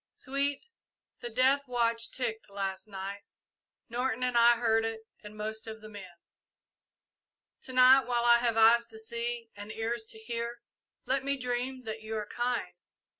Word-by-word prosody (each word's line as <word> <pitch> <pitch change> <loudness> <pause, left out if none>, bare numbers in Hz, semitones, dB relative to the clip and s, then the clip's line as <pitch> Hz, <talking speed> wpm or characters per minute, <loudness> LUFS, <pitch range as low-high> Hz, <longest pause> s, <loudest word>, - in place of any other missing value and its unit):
"Sweet, 280 - -2 0.5
the 240 - -6
death 260 +4 +3
watch 230 -2 +1
ticked 225 -4 -4
last 195 0 -4
night 195 0 -6 0.7
Norton 250 0 -1
and 250 -1 0
I 235 0 +7
heard 225 -1 +2
it 225 0 -3 0.2
and 210 0 -11
most 220 +1 -4
of 220 0 -7
the 215 0 -11
men. 200 -3 -9 1.6
To 260 - -8
night, 255 0 +7
while 240 -1 +1
I 235 0 +7
have 235 -2 0
eyes 235 +1 +6
to 225 -1 -10
see 235 +1 -4
and 205 +1 -8
ears 225 +1 -2
to 220 - -6
hear, 235 +1 -5 0.4
let 270 0 +1
me 280 0 -1
dream 250 +1 -3
that 220 -1 -6
you 220 0 -5
are 210 -1 -2
kind. 240 +3 -2
235 Hz, 165 wpm, -30 LUFS, 220-250 Hz, 1.6 s, I